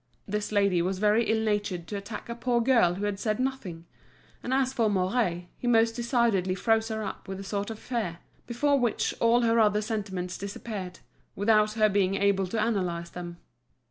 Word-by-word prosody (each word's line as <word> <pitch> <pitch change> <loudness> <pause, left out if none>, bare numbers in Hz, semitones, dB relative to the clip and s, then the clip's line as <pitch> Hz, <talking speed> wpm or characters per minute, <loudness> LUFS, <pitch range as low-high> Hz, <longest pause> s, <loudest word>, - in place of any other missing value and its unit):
This 210 +1 -2
lady 200 -4 +3
was 185 +2 -1
very 210 +3 +3
ill 220 0 +1
natured 205 -5 -1
to 205 - -6
attack 205 +2 -6
a 235 - -4
poor 240 0 0
girl 230 -8 +3
who 200 +2 -3
had 205 -1 -2
said 215 0 -1
nothing; 230 -11 -3 0.6
and 250 - -5
as 265 0 +1
for 230 -4 +2
Mouret, 185 -2 0
he 245 - -3
most 230 -1 +4
decidedly 235 -6 +1
froze 225 +2 +1
her 220 -1 -3
up 200 - -6
with 190 0 -5
a - - -6
sort 200 +1 -3
of 225 - -6
fear, 220 -9 -3 0.3
before 280 +4 +2
which 240 -4 0
all 235 +1 +4
her 230 0 +3
other 210 -1 +3
sentiments 195 -5 -4
disappeared, 200 -2 -6 0.3
without 210 +1 +3
her 215 -1 +4
being 195 -2 +1
able 195 -1 +2
to 215 +3 0
analyse 175 -6 -2
them. 175 -1 -7
210 Hz, 190 wpm, -27 LUFS, 190-230 Hz, 0.6 s, most